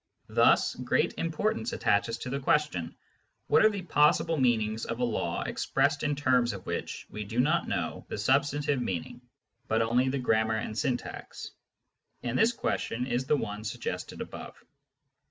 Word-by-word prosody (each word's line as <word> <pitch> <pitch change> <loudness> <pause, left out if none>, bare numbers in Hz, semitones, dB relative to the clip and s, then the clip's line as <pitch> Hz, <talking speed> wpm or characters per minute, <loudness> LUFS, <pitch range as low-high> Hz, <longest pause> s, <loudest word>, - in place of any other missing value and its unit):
Thus - - +4
great - - 0
importance 210 +8 -1
attaches 115 +3 +1
to 125 - -6
the 140 - -1
question: 135 - 0 0.5
What - - +4
are 215 - +7
the 200 -3 -4
possible 160 0 +3
meanings 110 -5 +1
of 115 - -3
a - - 0
law 85 -7 -1
expressed 140 +2 0
in 145 -1 0
terms 125 -4 +2
of 95 -2 -8
which - - -4
we 105 - -5
do 110 +4 -3
not 155 +6 +2
know - - -3
the - - -4
substantive 140 +4 +1
meaning, 95 +2 -4 0.5
but 110 +1 +2
only 125 +3 +2
the 140 - -1
grammar 110 -3 +1
and 110 0 -4
syntax? 120 +2 -4 0.7
And 120 0 -2
this 225 - +4
question 125 - -2
is 125 0 -1
the 150 - +2
one 105 -4 -4
suggested 110 - -5
above. - - -8
125 Hz, 160 wpm, -29 LUFS, 110-145 Hz, 0.7 s, are